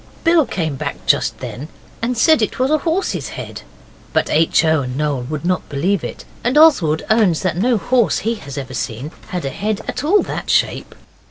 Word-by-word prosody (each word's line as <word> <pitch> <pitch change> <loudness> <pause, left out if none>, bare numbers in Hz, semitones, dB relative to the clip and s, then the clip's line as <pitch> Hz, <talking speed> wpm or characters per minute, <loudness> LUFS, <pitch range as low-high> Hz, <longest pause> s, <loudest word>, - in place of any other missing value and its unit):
Bill 330 -5 +4
came 160 -9 -2
back - - -5
just - - +2
then 140 +5 -6 0.3
and 240 +1 -1
said 315 +3 +4
it 215 - -1
was 260 +3 +1
a 310 - +3
horse's 340 +5 -1
head, - - -7 0.5
but - - +1
H. 165 +1 +3
O. 160 -2 +3
and 125 0 -4
Noel 145 -3 0
would 155 0 -4
not 180 0 -1
believe 175 +6 0
it, - - -7 0.2
and 250 +5 +1
Oswald 205 - +5
owns 210 -8 +3
that 185 -4 0
no 230 +6 +2
horse 240 +2 +2
he 230 - +2
has 140 - -8
ever 130 -2 -5
seen 125 +4 -4 0.2
had 180 -7 -4
a - - -1
head 210 +4 -2
at 255 - -3
all 395 +7 +4
that - - -5
shape. - - 0
185 Hz, 200 wpm, -19 LUFS, 150-250 Hz, 0.5 s, Oswald